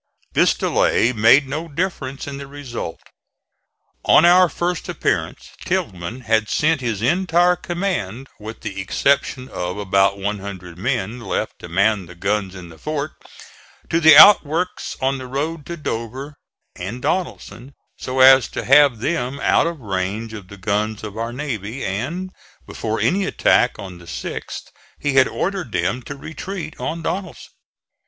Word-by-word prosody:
This - - +4
delay 120 +3 +2
made 120 +6 +5
no 155 +5 -4
difference 145 -4 -3
in 140 -1 -6
the 140 0 -8
result. 135 -11 -6 1.0
On 165 - +6
our 180 +1 +6
first 175 +3 -3
appearance - - -2
Tilghman 95 +7 -3
had 110 -2 +1
sent 155 -1 +1
his 115 -4 -2
entire 175 +4 +3
command, 175 - -3
with 110 +1 -9
the 95 -1 -5
exception 130 +5 0
of 90 -3 -4
about 100 0 +2
one 100 +1 -2
hundred 95 -3 -8
men 120 0 -2
left 115 - -3
to 85 - -9
man 100 +1 +1
the 90 - -12
guns 95 +1 -1
in 90 -2 -10
the 80 - -15
fort, 155 0 -3 0.8
to 165 - +3
the 160 -3 +8
outworks 180 -1 +5
on 135 0 0
the 130 - -7
road 145 +4 -3
to 170 - -5
Dover 130 +1 -5 0.4
and 95 +7 -6
Donelson, 125 - -3 0.2
so 130 0 -1
as 130 -1 +8
to - - -5
have 135 -4 +5
them 140 -2 -2
out - - +3
of 170 -2 -4
range 100 +2 -3
of 100 -4 -9
the 100 - -12
guns 105 +2 -2
of 105 -1 -7
our 115 +1 -3
navy; 120 -3 -4
and 150 - -3 0.3
before - - -3
any 190 +2 +1
attack 125 -9 +2
on 95 -4 -9
the 85 - -14
6th 80 - -6 0.3
he 145 - -1
had 135 -1 +5
ordered 190 - -3
them 90 +8 -1
to 140 - -8
retreat 160 +3 -7
on 165 +1 -4
Donelson. 190 +3 -5
125 Hz, 155 wpm, -20 LUFS, 105-155 Hz, 1.0 s, the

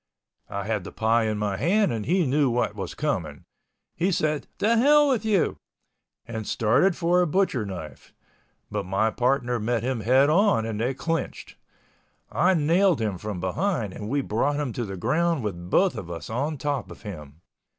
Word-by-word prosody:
I 100 0 -4
had 105 -2 -2
the - - -8
pie 115 +1 +2
in 110 -1 -1
my 105 -2 -1
hand 190 - +2
and 110 -2 -4
he 180 +2 +2
knew 140 0 +2
what 120 -2 0
was 95 -4 -6
coming. - - -3 0.5
He 180 +4 +1
said, 155 -3 0
"The 225 +3 +2
hell 295 +4 +5
with 255 -7 +1
you," 210 -5 +1 0.7
and 110 -2 -6
started 125 - +2
for 175 +1 +2
a 175 - +2
butcher 150 - 0
knife—but 95 +3 -9
my 100 +4 0
partner 125 -1 0
met 115 +1 -1
him 130 -1 -1
head 130 +6 +4
on 175 - +3
and 110 -1 -3
they 125 +3 0
clinched. 165 +4 -3 0.8
I 185 +2 +3
nailed 170 +2 +3
him 105 -5 -2
from 105 -2 -5
behind 110 - -1
and 105 - -6
we 140 +3 +1
brought 135 +5 0
him 140 -5 -2
to 120 - -3
the 95 -2 -6
ground 155 - +1
with 90 -4 -5
both 190 - +3
of 85 - -7
us 85 +4 -7
on 145 +6 -2
top 140 -2 -2
of - - -12
him. 75 -7 -9
125 Hz, 180 wpm, -25 LUFS, 105-165 Hz, 0.8 s, hell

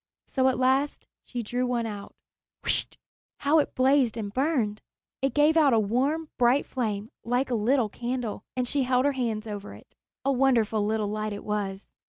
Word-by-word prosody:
So 260 -1 +1
at 260 - +2
last 265 +3 +1 0.2
she 245 -2 -5
drew 245 +3 -1
one 240 -2 0
out. 205 -2 -7 0.5
Whischt! - - 0 0.4
How 295 +3 +4
it 295 - -1
blazed 255 -3 +3
and 205 -2 -4
burned! 255 -7 0 0.4
It 270 -2 0
gave 300 +2 +4
out 295 -5 +5
a 225 - +5
warm, 270 +10 0
bright 250 +3 +4
flame 215 -4 -3
like 250 +3 0
a - - +1
little 235 +2 +2
candle, 240 -1 -4
as 250 -1 0
she 280 +2 +1
held 255 0 +2
her 285 - +4
hands 230 -5 -2
over 205 -2 -6
it. - - -18 0.3
A 275 - +3
wonderful 240 -5 +2
little 215 0 0
light 215 0 -2
it 205 - -7
was. 200 -2 -3
245 Hz, 185 wpm, -27 LUFS, 215-270 Hz, 0.5 s, out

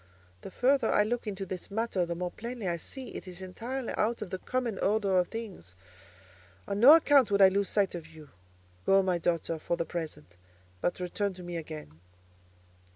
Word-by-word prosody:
The - - -8
further 265 +8 +2
I 210 - +4
look 235 +1 -2
into 195 -1 -4
this 185 -1 -6
matter, 200 -4 -1
the 170 - -3
more 180 +1 -3
plainly 235 -1 -6
I 170 -1 0
see 260 +9 -9
it - - -8
is 180 0 -8
entirely 230 +7 -5
out 225 +1 0
of 185 - -10
the 185 - -3
common 245 -3 -2
order 200 -2 +2
of 180 - +1
things. 200 - -8 0.9
On 200 0 -2
no 275 +8 +10
account 290 -6 +5
would 200 0 +2
I 190 -1 +9
lose 200 0 0
sight 200 -2 +1
of 170 -2 -7
you. 155 -4 -14 0.5
Go, 195 - +4
my 180 -2 +1
daughter, 165 -1 -1
for 170 - -2
the 170 - -1
present; 155 - -6 0.4
but 175 - -1
return 190 +2 -2
to 180 - -10
me 175 0 -6
again." 155 - -7
190 Hz, 195 wpm, -30 LUFS, 175-225 Hz, 0.9 s, no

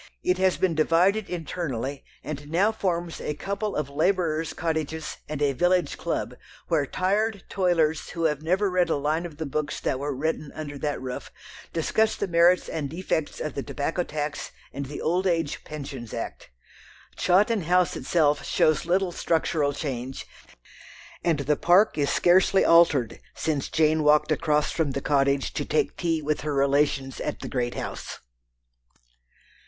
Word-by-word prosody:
It 180 0 +1
has 190 -1 +3
been 185 -2 +1
divided 180 +7 +2
internally, 145 -6 -4 0.2
and 145 -1 -6
now 190 +7 +3
forms 175 -5 -2
a 150 - -3
couple 200 +5 -3
of 150 -2 -1
labourers' 165 +1 0
cottages 160 -1 -3
and 150 -1 -2
a 140 -1 +2
village 180 +5 +2
club, - - -3 0.4
where 155 -5 +2
tired 200 +4 0
toilers 165 -4 +1
who 165 -1 -4
have 150 -3 +1
never 185 +5 +1
read 180 -2 +2
a - - +2
line 155 +4 -1
of 155 -4 -14
the 160 - -3
books 145 +1 -3
that 130 - -1
were 145 0 -3
written 155 +1 -2
under 145 -2 -6
that 145 0 -2
roof 130 -1 -6 0.4
discuss 220 +7 +1
the 200 - -2
merits 175 +1 +4
and 150 -3 -3
defects 160 -2 -2
of 155 - -3
the 140 - -3
tobacco 155 +6 -2
tax 150 -3 -4 0.2
and 140 -1 -4
the 145 - -6
Old 180 +4 +1
Age 165 -4 -1
Pensions 135 -6 -7
Act. - - -6 0.7
Chawton 205 +4 +3
House 180 +1 +3
itself 150 -4 +1
shows 155 +1 +2
little 185 +1 +2
structural 160 -3 0
change, 135 -3 -5 1.0
and 165 -4 +1
the 150 +2 +1
park 180 +8 +4
is 140 -1 +2
scarcely 185 +4 +4
altered 165 -8 +4 0.2
since 150 -4 -1
Jane 155 0 +2
walked 150 +1 +4
across 150 -1 +1
from 155 -5 -1
the 140 - -2
Cottage 140 -1 +1
to - - -2
take 445 - 0
tea 165 -3 -1
with 150 +1 -1
her 150 -1 -2
relations 140 -1 +1
at - - -4
the - - -5
great 120 -2 -2
house. - - -5
160 Hz, 160 wpm, -26 LUFS, 145-180 Hz, 1.0 s, merits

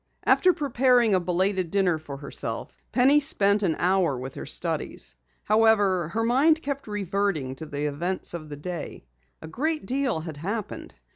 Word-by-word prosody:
After 365 - +5
preparing 250 - +2
a 185 - +4
belated 185 +1 0
dinner 180 -3 +1
for 145 -3 -8
herself, 140 0 -6 0.2
Penny 270 +4 +5
spent 205 -8 +2
an 175 -6 +1
hour 180 -6 +2
with 130 +1 -6
her - - -7
studies. - - -3 0.3
However, 205 -5 +3
her 225 +8 -2
mind 290 +7 +3
kept 280 -2 -4
reverting 195 -9 -1
to 160 - -8
the 145 0 -3
events 170 +7 -2
of 155 -3 -7
the 145 - -7
day. 170 - -6 0.4
A - - -7
great 305 - -2
deal 260 -9 0
had 155 -2 -7
happened. 200 +7 -5
195 Hz, 160 wpm, -26 LUFS, 160-240 Hz, 0.4 s, After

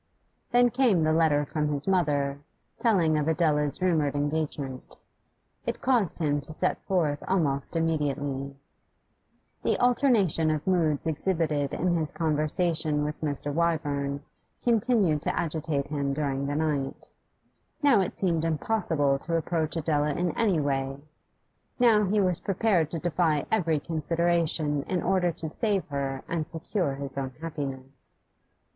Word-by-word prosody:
Then 245 0 +4
came 235 -10 +3
the 155 0 +2
letter 155 -3 +3
from 150 +1 -1
his 145 +1 -1
mother, 145 -7 +1 0.4
telling 175 -10 +3
of 150 - -1
Adela's 150 -3 +1
rumoured 155 -6 +2
engagement. 145 -3 -3 0.7
It - - -2
caused 240 -8 +1
him 145 -3 0
to 145 - -10
set 155 - -1
forth 155 -6 0
almost 145 -6 0
immediately. 145 -4 -1 1.1
The - - +1
alternation 235 - +3
of 155 -1 -1
moods 165 -6 +1
exhibited 155 -3 0
in 175 +1 +1
his 160 -2 -1
conversation 155 -1 0
with 150 +1 -5
Mr. 145 -1 -3
Wyvern 145 -4 -1 0.4
continued 220 - +2
to - - -1
agitate 155 -3 -2
him 140 -2 -1
during 140 -2 -1
the 145 - -2
night. 150 -3 -2 0.7
Now 270 -8 +5
it 185 - -3
seemed 170 -4 +1
impossible 160 -4 0
to 165 +3 -3
approach 160 -1 -1
Adela 150 -2 +1
in 175 -1 0
any 205 -8 +2
way; 135 -1 -1 0.8
now 225 -4 +5
he 205 +3 +1
was 185 -4 +2
prepared 195 -5 +1
to 165 - -3
defy 165 -3 +1
every 165 -8 +2
consideration 165 -1 0
in 180 -2 -1
order 180 -2 +2
to 160 - -4
save 200 +3 -1
her 135 -1 -3
and 160 -2 -2
secure 165 -2 -2
his 140 0 -5
own 130 -1 -4
happiness. 140 -4 -6
155 Hz, 140 wpm, -27 LUFS, 145-175 Hz, 1.1 s, Now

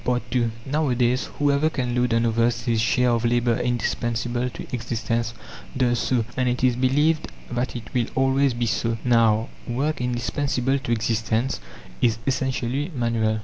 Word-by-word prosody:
II 120 -2 +2 0.2
Nowadays, 130 -4 +1
whoever 145 +1 +3
can 125 -5 -2
load 125 0 +1
on 115 0 +2
others 115 +1 +1
his 115 -2 +1
share 125 +2 +3
of 115 -1 +1
labour 120 0 +2
indispensable 120 +1 -1
to - - -8
existence 115 -1 -2 0.4
does 120 -2 +2
so, 120 -4 +1
and 130 -1 +1
it 125 +1 -2
is 125 -2 +4
believed 145 +5 +2 0.2
that 120 +2 -2
it 120 - -8
will 120 -2 +1
always 135 0 +2
be 120 0 0
so. 115 +1 0
Now, 115 -2 +3 0.2
work 135 +4 -1
indispensable 125 +2 0
to 120 - -4
existence 115 +2 0 0.4
is 115 -2 +3
essentially 130 +3 -1
manual. 115 -3 +1
120 Hz, 150 wpm, -24 LUFS, 115-130 Hz, 0.4 s, is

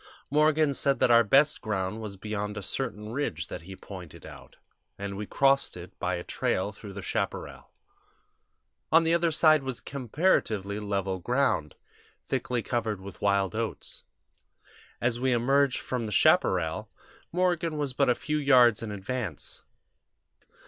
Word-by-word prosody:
Morgan 150 0 +3
said 140 0 +1
that 120 - +3
our 115 0 +7
best 140 +8 +3
ground 105 0 -2
was 105 -3 -7
beyond 105 0 -4
a 105 - -5
certain 105 -1 -3
ridge 115 - -3
that - - -6
he 95 +3 -10
pointed 90 -5 -11
out, - - -12 0.4
and 100 0 -5
we 105 +1 -5
crossed 135 -6 +2
it 90 0 -10
by 90 0 -1
a 85 - -5
trail 95 +3 -1
through 100 -1 -10
the 100 -1 -7
chaparral. - - -4 1.2
On 165 +1 +6
the 165 0 +2
other 170 0 +3
side 155 -1 +5
was 130 -3 -4
comparatively 115 - 0
level 100 -2 -2
ground, 120 - 0 0.4
thickly 120 -2 -2
covered 110 -5 -2
with 95 -1 -11
wild 100 -1 +2
oats. 110 0 -4 1.0
As 120 0 0
we 130 0 +2
emerged 135 +2 +2
from 120 -3 -3
the - - -5
chaparral, - - +2 0.4
Morgan 175 -3 0
was 145 -3 -1
but 135 0 +2
a 125 - +4
few 150 +1 -2
yards 125 -6 +5
in 115 - -5
advance. 105 - -4
115 Hz, 150 wpm, -28 LUFS, 100-140 Hz, 1.2 s, our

